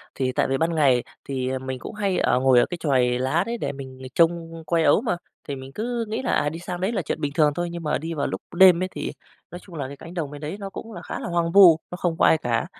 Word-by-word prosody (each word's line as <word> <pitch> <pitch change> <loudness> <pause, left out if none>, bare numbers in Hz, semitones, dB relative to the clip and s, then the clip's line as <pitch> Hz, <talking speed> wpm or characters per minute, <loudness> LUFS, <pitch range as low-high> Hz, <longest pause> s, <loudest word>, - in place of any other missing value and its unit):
Thì 130 -1 0
tại - - +1
vì 135 0 0
ban 165 +2 0
ngày 135 -6 +3 0.2
thì 130 -1 -2
mình 130 -1 -5
cũng - - -8
hay 200 -3 0
ở 125 - +2
ngồi 130 -2 +5
ở - - +4
cái 175 - -6
chòi 125 -5 +2
lá 135 +6 +1
đấy 235 0 -2
để - - -3
mình 130 -1 -10
trông 165 -1 +1
coi 165 -1 +2
ấu 150 +8 +4
mà, 220 -8 -1 0.3
thì 140 - -3
mình 130 0 -9
cứ 235 +1 -2
nghĩ 220 +4 -3
là, 255 - -1
à, 145 - +2
đi 165 +2 -7
sang 175 +1 -6
đấy 195 +5 0
là 195 -5 -1
chuyện 150 - -4
bình 145 -1 -2
thường 150 -2 +4
thôi. 175 0 -2
Nhưng 170 -1 -6
mà 150 - 0
đi 165 +2 -5
vào 145 - -1
lúc - - -4
đêm 185 -1 +7
ấy 185 - -2
thì - - -4 0.4
nói 175 - -7
chung 180 -3 -14
là 140 -4 -3
cái 140 +1 -9
cánh 165 +2 -11
đồng 155 -5 -3
bên 145 0 -9
đấy 155 +7 -5
nó 195 -1 -5
cũng 225 +3 -9
là 175 - -8
khá - - -6
là - - -5
hoang 170 -1 0
vu, 175 -5 +8
nó - - -4
không 170 -3 -1
có - - +4
ai 160 - +5
cả. 120 -4 -1
165 Hz, 300 wpm, -24 LUFS, 135-180 Hz, 0.4 s, vu